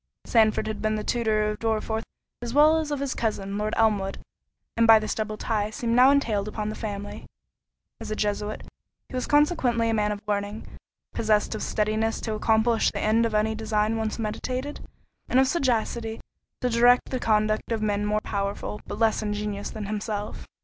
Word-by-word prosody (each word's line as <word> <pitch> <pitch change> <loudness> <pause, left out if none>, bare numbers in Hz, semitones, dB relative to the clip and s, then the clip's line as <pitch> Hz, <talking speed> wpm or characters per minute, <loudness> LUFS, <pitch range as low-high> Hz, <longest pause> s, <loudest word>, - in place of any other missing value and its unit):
Sandford 220 -2 +3
had 215 -1 -4
been 215 0 0
the 215 - -3
tutor 215 -2 +1
of 210 0 -3
Dorriforth 220 0 -1 0.4
as 240 +1 -5
well 305 +2 +6
as 310 -2 -3
of 290 -2 -2
his 280 -2 -1
cousin, 200 -3 -2
Lord 215 +1 -1
Elmwood, 205 -3 +1 0.6
and 230 0 +3
by 225 -1 +9
this 215 -1 -2
double 215 -1 -3
tie 210 -2 -1
seemed 230 +1 -1
now 255 +2 +7
entailed 225 -8 +1
upon 215 0 -3
the - - -3
family. 205 -2 -6 0.7
As 225 -2 -7
a 215 - -2
Jesuit, 210 0 -2 0.5
he - - -14
was 255 -1 -2
consequently 265 -7 +2
a - - 0
man 210 -1 +1
of 205 - -3
learning; 205 +1 -2 0.5
possessed 215 -1 +1
of 215 - -5
steadiness 215 +1 0
to 220 - -3
accomplish 220 +1 +2
the - - -5
end 225 +2 +3
of 220 - -4
any 215 +1 +2
design 215 0 0
once 220 -1 -2
meditated, 255 +5 -4 0.5
and 255 - +4
of 265 - +5
sagacity 235 -6 -1 0.4
to 250 - +1
direct 240 +2 +4
the 260 - -1
conduct 215 -1 +1
of 220 -1 -1
men 205 -1 0
more 210 +1 0
powerful, 200 +1 -3
but - - -5
less 225 -1 +2
ingenious, 210 -1 -3
than 215 -2 -6
himself. 210 0 -4
220 Hz, 185 wpm, -26 LUFS, 210-230 Hz, 0.7 s, by